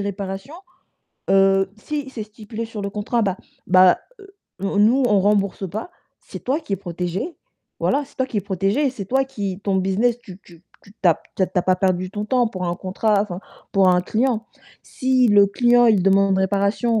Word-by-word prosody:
réparations, 200 +6 -5 0.8
heu, 195 0 +4
si 290 +2 -5
c'est 220 -5 -6
stipulé 215 +1 -8
sur 220 -2 -7
le 200 - -3
contrat, 215 +3 -1
bah, 195 -3 0 0.3
bah, 185 0 +6 0.2
heu, 395 0 -16 0.3
nous 200 +1 -1
nous 240 +6 +4
on 205 -4 +3
rembourse 200 -1 0
pas, 220 - -5 0.3
c'est - - -10
toi 270 +4 0
qui 260 - -7
est - - -4
protégé, 180 - -4 0.5
voilà, 290 - +1
c'est - - -22
toi 260 - 0
qui 235 - -6
est - - -1
protégé, 200 - 0
c'est 225 -6 -7
toi 265 +5 +1
qui 200 -8 -5
ton 195 -1 0
business 205 +6 +1
tu 190 -6 -12
tu 170 -1 -18 0.2
tu 200 - -18
tu 185 - +4
as 165 - +5
p - - -20 0.2
tu 190 - +1
as - - -5
tu 185 - -2
as - - +1
pas 185 0 +2
perdu 185 -1 0
ton 205 +1 -4
temps 245 +2 +2
pour 185 -4 -5
un 175 - -1
contrat 200 +2 0
enfin, 185 -4 -6 0.3
pour 195 -1 +4
un 180 0 +4
client. 230 +2 -1 0.4
Si 255 -3 +1
le 205 -1 +6
client 240 +4 +3
il 210 -5 +4
demande 195 0 +3
réparation 200 +4 +1
200 Hz, 210 wpm, -21 LUFS, 190-235 Hz, 0.8 s, bah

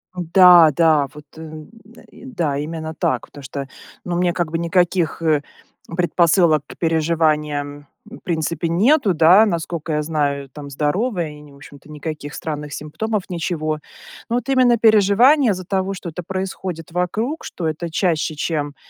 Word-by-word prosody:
Да, 175 -2 +6
да, 155 -3 +3
вот, 150 0 -12
э, - - -9
м, 155 +1 -10 0.4
э, - - -14
да, 170 - -2
именно 160 +1 -5
так. 130 -5 -1
Потому 145 - -13
что, 140 0 -6 0.4
ну, 175 -1 -2
мне 175 0 +1
как 175 -4 -2
бы 165 - -1
никаких, 170 0 0
э, 155 -3 +2 0.6
предпосылок 170 -2 +3
к - - -12
переживаниям 150 -3 -1 0.2
в 225 +3 -12
принципе 165 0 -2
нету, 210 - +3
да, 175 +7 +6
насколько 170 -4 -3
я 150 - 0
знаю, 145 -3 -2
там 140 +1 -10
здоровая, 165 - -1
и 150 0 -13
не 145 -1 -15
в - - -16
общем-то, 140 +1 -15
никаких 150 -1 -6
странных 150 -2 -5
симптомов, 195 +7 -3
ничего. 160 -3 -2 0.5
Но 235 - 0
вот 245 - -2
именно 250 -3 +4
переживания 225 +5 +4
из-за 185 -1 -5
того, 195 +1 -1
что 180 -2 -7
это 180 +3 -6
происходит 185 -3 -5
вокруг, 220 - -2
что 170 - -4
это 160 +2 -4
чаще, 160 -3 0
чем, 145 -2 -3
165 Hz, 160 wpm, -20 LUFS, 150-185 Hz, 0.6 s, Да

